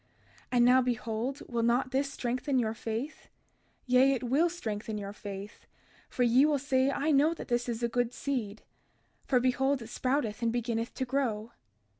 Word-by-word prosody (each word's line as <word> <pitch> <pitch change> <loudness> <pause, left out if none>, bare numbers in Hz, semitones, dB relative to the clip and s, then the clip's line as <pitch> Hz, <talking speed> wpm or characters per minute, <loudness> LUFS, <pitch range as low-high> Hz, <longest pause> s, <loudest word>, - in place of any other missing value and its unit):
And 240 -1 +4
now 255 +1 +6
behold, 240 +2 -2
will 235 -1 -1
not 240 +3 +1
this 275 +1 0
strengthen 255 +1 -1
your 225 -3 +1
faith? 230 +6 -5 0.6
Yea, 260 +1 +5
it 255 - -3
will 280 +8 +2
strengthen 220 -10 -4
your 200 -1 -6
faith: 200 0 -9 0.4
for 250 - 0
ye 245 +3 +5
will 300 -1 +3
say 265 -1 +1
I 290 +3 0
know 300 +4 +4
that - - -9
this 240 0 0
is 235 0 -3
a - - +3
good 245 0 0
seed; 235 -6 -3 0.6
for 255 - +3
behold 265 +2 +1
it 225 -2 -9
sprouteth 250 -3 -1
and 230 -1 +1
beginneth 230 -1 -2
to 260 - -2
grow. 240 -4 -1
245 Hz, 175 wpm, -30 LUFS, 230-270 Hz, 0.6 s, now